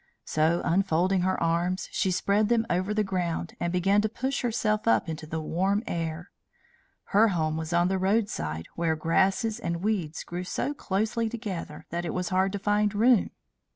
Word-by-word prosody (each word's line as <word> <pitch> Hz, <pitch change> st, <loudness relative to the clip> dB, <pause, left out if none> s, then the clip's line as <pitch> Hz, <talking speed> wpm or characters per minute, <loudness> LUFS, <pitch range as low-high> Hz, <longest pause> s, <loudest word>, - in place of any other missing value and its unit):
So, 160 Hz, +2 st, +1 dB
unfolding 185 Hz, +1 st, +2 dB
her 185 Hz, +1 st, 0 dB
arms, 170 Hz, +3 st, 0 dB
she 190 Hz, -, 0 dB
spread 200 Hz, +3 st, +1 dB
them 230 Hz, -1 st, +2 dB
over 185 Hz, +3 st, 0 dB
the 215 Hz, 0 st, +1 dB
ground, 175 Hz, -3 st, -2 dB
and 170 Hz, -, -1 dB
began 195 Hz, +3 st, +3 dB
to 215 Hz, -, 0 dB
push 265 Hz, +5 st, -2 dB
herself 220 Hz, -3 st, 0 dB
up 230 Hz, -, +3 dB
into 155 Hz, -1 st, -5 dB
the 160 Hz, +1 st, -3 dB
warm 190 Hz, +7 st, 0 dB
air. 165 Hz, -1 st, -4 dB, 0.8 s
Her 215 Hz, +3 st, +6 dB
home 160 Hz, -6 st, 0 dB
was 160 Hz, +1 st, -4 dB
on 175 Hz, +1 st, +3 dB
the 190 Hz, 0 st, 0 dB
roadside, 185 Hz, -, 0 dB
where 165 Hz, -1 st, 0 dB
grasses 190 Hz, +8 st, +1 dB
and 170 Hz, -4 st, -3 dB
weeds 185 Hz, -8 st, -1 dB
grew 175 Hz, +1 st, -5 dB
so 280 Hz, +9 st, -2 dB
closely 220 Hz, -1 st, -1 dB
together 200 Hz, -10 st, -6 dB
that 170 Hz, +1 st, -2 dB
it 170 Hz, -, -3 dB
was 180 Hz, -1 st, -1 dB
hard 190 Hz, +1 st, +2 dB
to -, -, -1 dB
find 205 Hz, +1 st, +1 dB
room. 230 Hz, +1 st, +4 dB
185 Hz, 180 wpm, -27 LUFS, 170-210 Hz, 0.8 s, Her